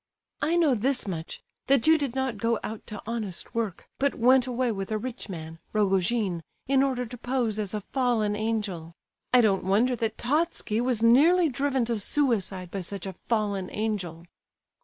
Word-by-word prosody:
"I 325 +2 +2
know 325 -6 +4
this 250 +1 0
much, 165 -4 -5 0.2
that 275 -3 +3
you 320 +1 +7
did 280 -5 -2
not 265 -5 -1
go 230 +1 +1
out 220 0 -6
to 210 - -7
honest 215 -5 -4
work, 225 -6 -3
but 280 +1 +1
went 255 +2 +4
away 250 -1 0
with 195 -1 -4
a 215 - +1
rich 240 0 -6
man, 165 -2 -7
Rogojin, 195 -2 +1 0.3
in 270 0 +4
order 260 -2 0
to 245 +2 -8
pose 245 -4 -1
as 210 -1 -2
a 210 - -2
fallen 235 -6 +1
angel. 210 -7 -3 0.4
I 250 - +7
don't 200 -4 +2
wonder 220 +7 +2
that 225 -1 -2
Totski 275 -5 0
was 245 -3 +1
nearly 315 +9 +6
driven 270 -1 0
to 230 -2 -1
suicide 200 -8 0
by 195 - -3
such 195 +1 -5
a 190 - -5 0.2
fallen 205 -5 0
angel." 195 -6 -3
225 Hz, 180 wpm, -27 LUFS, 200-255 Hz, 0.4 s, you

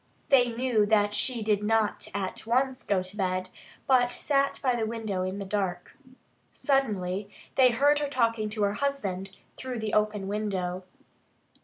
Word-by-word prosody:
They 250 -4 +5
knew 230 -3 +1
that 205 -1 +3
she 235 +1 +1
did 210 -1 +1
not 220 0 +1
at 195 +2 -4
once 260 +2 +1
go 190 -2 0
to 185 +2 -5
bed, 185 -2 -1 0.3
but 245 -2 +4
sat 275 0 +1
by 255 -2 +2
the 225 -2 -1
window 220 -4 -3
in 185 +1 -3
the 200 - -5
dark. 190 -3 -3 0.6
Suddenly 205 - 0 0.3
they 260 -2 +6
heard 285 +5 +3
her 290 -1 -2
talking 230 -5 +1
to 210 0 -2
her 200 0 +2
husband 205 -8 -2 0.3
through 255 -1 -5
the 220 -1 -3
open 210 -2 +1
window. 190 -3 -2
215 Hz, 160 wpm, -28 LUFS, 195-250 Hz, 0.6 s, they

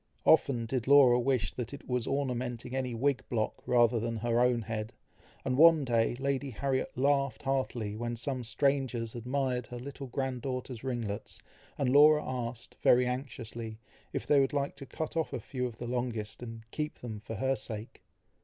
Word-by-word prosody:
Often 135 -7 +4
did 125 +1 -2
Laura 135 -3 +7
wish 120 - 0
that 125 +2 -5
it - - -14
were 125 -1 +1
ornamenting 125 -3 -2
any 130 -2 -2
wig 135 +3 +1
block, 110 -3 -1
rather 120 -1 +4
than 115 +1 -2
her 120 +1 +1
own 120 -1 +3
head; 110 0 -4 0.5
and 130 +1 0
one 160 -3 +7
day 115 -1 +2
Lady 140 +1 -1
Harriet 130 +2 -1
laughed 140 0 +1
heartily, 125 -6 -1
when 120 +1 -3
some 125 +2 -2
strangers 120 -1 0
admired 125 +1 -1
her 125 - -7
little 135 +2 -7
grand 130 0 -2
daughter's 125 -2 -4
ringlets, 115 -6 -4 0.4
and 135 -3 +1
Laura 150 +1 +7
asked, 120 -2 -5
very 125 +1 +5
anxiously, 120 -3 -5 0.3
if - - -3
they 145 - +5
would 135 0 +2
like 140 -1 -1
to 140 - -8
cut 160 +4 -5
off 160 -1 -1
a - - -2
few 125 -2 -3
of 115 -2 -9
the 120 - -6
longest, 120 -4 -3
and 115 -2 -7
keep 150 0 -4
them 110 -4 -6
for 110 +1 -7
her 130 +5 +1
sake. 110 -3 -7
125 Hz, 180 wpm, -31 LUFS, 115-135 Hz, 0.5 s, Laura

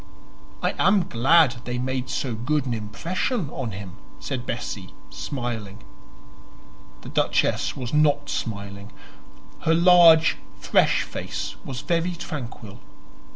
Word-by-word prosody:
"I - - +1
am 195 -2 +4
glad 135 +2 +4
they 125 0 -3
made 130 0 -2
so 130 -4 -2
good 130 +6 -1
an 125 - -1
impression 150 - -2
on 125 -4 -4
him," 100 -1 -8 0.2
said 130 -3 -5
Bessie, 100 -5 -5 0.2
smiling. 115 -7 -5 1.2
The - - -9
Duchess - - +1
was 125 -1 -5
not 145 -1 +3
smiling; 100 -2 -5 0.7
her 160 - +2
large 170 -2 +7 0.2
fresh - - +3
face 75 - -5
was 130 -2 -6
very 170 +1 0
tranquil. 120 -10 -7
130 Hz, 115 wpm, -24 LUFS, 110-160 Hz, 1.2 s, large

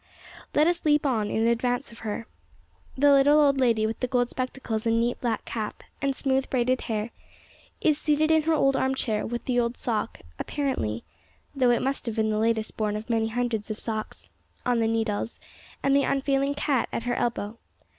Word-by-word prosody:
Let 300 - +5
us 345 +1 +1
leap 295 -1 +3
on 220 -6 +1
in 225 - +1
advance 245 +3 0
of 230 - -13
her. 220 +1 -4 0.7
The 285 +2 +5
little 285 +2 +6
old 280 -2 +4
lady 230 -4 +3
with 220 +1 -3
the 250 - -1
gold 245 -1 +1
spectacles 255 -4 -3
and 230 0 +3
neat 240 +1 0
black 230 -3 -1
cap, 215 -2 -5 0.2
and 275 -1 0
smooth, 265 -1 0
braided 255 0 +1
hair, 220 +1 -2 0.7
is 305 -1 +3
seated 310 +1 +2
in 320 0 +5
her 320 +1 +1
old 275 -2 +3
arm 265 0 +1
chair, 220 -5 -1
with 240 +1 -4
the 245 -1 +1
old 235 +1 -1
sock, 225 -3 -2 0.2
apparently 255 - -2 0.5
though 260 -3 +3
it 240 - +2
must 270 -1 -2
have 225 - -2
been 220 -1 +1
the 215 - 0
latest 220 -1 0
born 210 -1 0
of 220 +3 -4
many 225 -1 +2
hundreds 230 -2 -2
of 215 - -3
socks 220 -2 -5 0.3
on 245 -1 +2
the 225 - +2
needles, 225 -1 -1 0.4
and 275 0 +3
the 280 - +5
unfailing 275 0 +1
cat 275 -4 0
at - - -3
her 245 0 -1
elbow. 230 -2 -2
245 Hz, 195 wpm, -26 LUFS, 225-275 Hz, 0.7 s, little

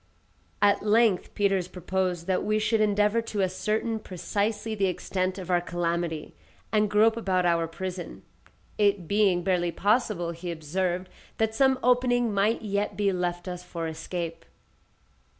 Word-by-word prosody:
At 205 0 +4
length 215 -2 +2
Peters 195 -3 +1
proposed 180 -1 -2
that 185 0 0
we 215 0 +1
should 215 +1 +1
endeavour 210 +2 +3
to 215 -3 -2
ascertain 215 +4 -1
precisely 210 +3 -2
the 200 -2 +1
extent 185 +1 -2
of 185 -1 -5
our 175 -1 +3
calamity, 170 -2 -2 0.4
and 210 -1 +2
grope 215 +2 +4
about 190 -5 0
our 170 -1 +2
prison; 180 +2 -6 0.6
it 200 -4 +2
being 200 -3 +2
barely 175 -2 +1
possible, 200 -2 +1
he 170 +1 -6
observed, 175 +3 -2 0.3
that 220 0 +1
some 265 +2 +3
opening 245 -2 +3
might 205 +3 +1
yet 205 -1 -2
be 200 -2 +2
left 175 0 -2
us 180 -1 -5
for 170 -2 -5
escape. 165 +1 -5
190 Hz, 145 wpm, -27 LUFS, 175-215 Hz, 0.6 s, At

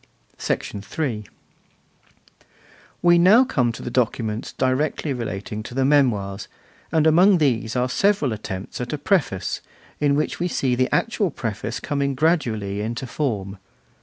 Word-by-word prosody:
III. 105 +2 -3 1.8
We 175 0 +6
come - - +4
now 215 +8 +7
to 125 - -1
the 120 - -5
documents 115 -3 -1
directly 135 +3 0
relating 110 -3 -4
to 120 +3 -9
the 135 0 +2
Memoirs, 110 -9 +2 0.4
and 160 -1 +3
among 180 +5 +6
these 120 -7 0
are 125 0 +1
several 175 - +1
attempts 100 0 -6
at 125 - -4
a - - -1
preface, 145 - 0 0.4
in 145 -1 +2
which 150 - -1
we 175 - 0
see 135 -7 0
the 130 +1 +1
actual 220 -4 +1
preface 115 -4 -4
coming 140 -1 -1
gradually 115 - 0
into 115 +4 -3
form. 105 -8 -3
130 Hz, 135 wpm, -23 LUFS, 110-155 Hz, 1.8 s, now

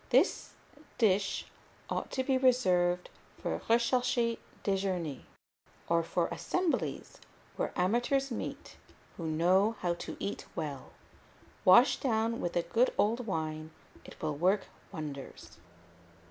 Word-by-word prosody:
This - - +2 0.4
dish 200 -4 +2 0.4
ought - - -3
to 260 - 0
be 265 0 +1
reserved 185 -9 +3 0.3
for - - -3
recherché 235 0 +2 0.2
déjeûners, 185 -7 -1 0.7
or 170 0 +3
for 165 - 0
assemblies 360 -2 -2 0.4
where - - -2
amateurs 245 +8 +1
meet 230 - -6 0.4
who 165 - -4
know 185 +7 +3
how 175 -1 +1
to 170 - -7
eat 200 - -4
well; 145 -5 -4 0.7
washed 235 +8 +6
down 230 -2 0
with 175 - -2
a 175 - +2
good 230 +9 +2
old 230 +3 +1
wine, 155 -4 -3 0.3
it - - -13
will 155 -1 -1
work 185 +6 +2 0.3
wonders. 150 - -8
195 Hz, 120 wpm, -31 LUFS, 170-235 Hz, 0.7 s, washed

